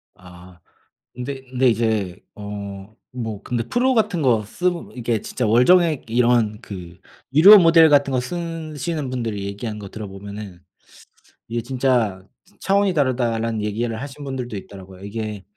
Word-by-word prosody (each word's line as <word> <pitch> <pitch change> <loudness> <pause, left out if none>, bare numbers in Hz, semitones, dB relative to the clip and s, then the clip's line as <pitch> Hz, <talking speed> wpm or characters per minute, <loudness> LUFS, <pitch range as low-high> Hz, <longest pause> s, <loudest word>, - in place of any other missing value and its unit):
아. 90 0 -15 0.6
네 135 +2 -6
근데 130 0 +2
이제 110 -6 0 0.2
어 100 0 -8 0.2
뭐 110 -5 -5
근데 120 +1 -2
프로 255 +2 +2
같은 205 -9 +1
거 115 -5 +3
쓰 180 +10 0
보 170 -1 -7
이게 115 -3 -1
진짜 125 - -3
월정액 150 +5 +4
이런 120 -3 +2
그 90 -3 -9 0.4
유료 200 +7 +10
모델 165 -2 +6
같은 140 -1 +4
거 130 -1 +1
쓰시는 160 -2 -4
분들이 115 -6 -3
얘기한 105 +2 -5
거 100 -2 -9
들어보면은 100 -2 -9 0.8
"이게 115 0 -2
진짜 120 -6 0 0.4
차원이 200 0 +2
다르다."라는 115 -7 0
얘기를 110 +2 -2
하신 145 +1 -8
분들도 125 -5 -5
있더라고요. 95 -1 -12
이게 105 -1 -5
115 Hz, 295 characters per minute, -21 LUFS, 105-140 Hz, 0.8 s, 유료